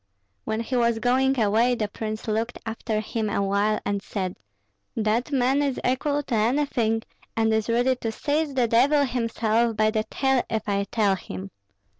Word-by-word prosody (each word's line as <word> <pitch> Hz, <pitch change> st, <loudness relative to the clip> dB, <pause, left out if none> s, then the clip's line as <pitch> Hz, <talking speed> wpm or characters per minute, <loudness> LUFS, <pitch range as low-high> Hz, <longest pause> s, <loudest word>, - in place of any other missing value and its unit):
When 220 Hz, +1 st, -1 dB
he 240 Hz, +3 st, -3 dB
was 235 Hz, -2 st, +2 dB
going 260 Hz, +3 st, +2 dB
away 225 Hz, +3 st, +3 dB
the 215 Hz, -3 st, -1 dB
prince 215 Hz, +1 st, -5 dB
looked 220 Hz, +2 st, -1 dB
after 225 Hz, -1 st, -2 dB
him 220 Hz, 0 st, -2 dB
awhile 200 Hz, +1 st, +1 dB
and 200 Hz, -1 st, -1 dB
said, 185 Hz, -2 st, -4 dB, 0.6 s
'That 225 Hz, +5 st, 0 dB
man 270 Hz, +1 st, +2 dB
is 280 Hz, -3 st, -1 dB
equal 285 Hz, +3 st, 0 dB
to 255 Hz, -, -5 dB
anything, 225 Hz, -1 st, +1 dB, 0.3 s
and 220 Hz, 0 st, +2 dB
is 220 Hz, +1 st, 0 dB
ready 245 Hz, +3 st, +2 dB
to 225 Hz, -2 st, -3 dB
seize 290 Hz, +4 st, -1 dB
the 250 Hz, -2 st, +3 dB
devil 275 Hz, +6 st, +4 dB
himself 230 Hz, -2 st, 0 dB
by 215 Hz, 0 st, +3 dB
the 215 Hz, -1 st, 0 dB
tail 265 Hz, -2 st, +1 dB
if 220 Hz, -1 st, -2 dB
I 200 Hz, -1 st, 0 dB
tell 205 Hz, -2 st, +1 dB
him!' 95 Hz, -, -8 dB
225 Hz, 170 wpm, -25 LUFS, 215-255 Hz, 0.6 s, devil